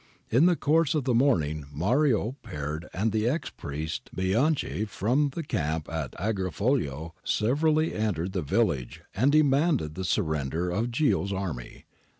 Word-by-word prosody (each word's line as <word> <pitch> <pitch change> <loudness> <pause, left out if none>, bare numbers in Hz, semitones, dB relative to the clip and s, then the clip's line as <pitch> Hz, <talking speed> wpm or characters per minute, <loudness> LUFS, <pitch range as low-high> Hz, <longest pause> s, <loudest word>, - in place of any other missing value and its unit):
In 135 +9 +5
the 180 - +4
course 160 0 +2
of 150 - +1
the 125 -1 +1
morning 80 - +2
Mario, 115 - +1
Peard, 75 - -5
and 105 +5 0
the 110 +2 +1
ex 155 +6 -2
priest 75 +2 -5
Bianchi 105 - +1
from 125 +8 +1
the 170 - -3
camp 80 - -2
at 80 -5 -3
Agrifoglio, 95 - -1
severally 155 +7 +1
entered 95 -5 -1
the 95 -2 -1
village 65 -4 0
and 130 +8 +3
demanded 145 - +3
the 95 +4 -5
surrender 80 -2 -1
of 110 +7 0
Ghio's 120 -6 +1
army. 90 -11 -5
105 Hz, 145 wpm, -27 LUFS, -, -, In